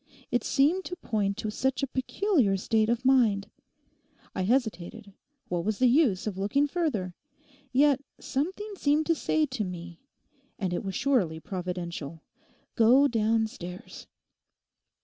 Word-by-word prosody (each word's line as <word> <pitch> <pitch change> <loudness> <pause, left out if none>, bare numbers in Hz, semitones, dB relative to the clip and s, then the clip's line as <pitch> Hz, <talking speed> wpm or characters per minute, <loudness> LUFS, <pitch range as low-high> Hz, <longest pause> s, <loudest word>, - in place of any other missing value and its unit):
It 245 - +1
seemed 305 +7 +2
to 360 - -5
point 210 - -1
to 215 -1 -3
such 265 +4 -1
a - - +1
peculiar 260 - +1
state 220 +3 +1
of 240 +2 -1
mind. 220 -6 +3 0.8
I - - -2
hesitated; 200 -3 -1 0.3
what 175 -1 -2
was 210 +2 -1
the 255 - +3
use 245 - +3
of 200 -3 -4
looking 275 +9 +2
further? 280 - -2 0.6
Yet 280 +1 +4 0.2
something 380 +10 -3
seemed 300 0 +2
to 330 - +3
say 315 -1 +1
to 255 -6 -3
me—and 180 - -8
it - - -2
was 195 -2 -4
surely 225 - +1
providential—"Go 180 - -1
downstairs!" 220 -5 -2
225 Hz, 130 wpm, -28 LUFS, 190-275 Hz, 0.8 s, Yet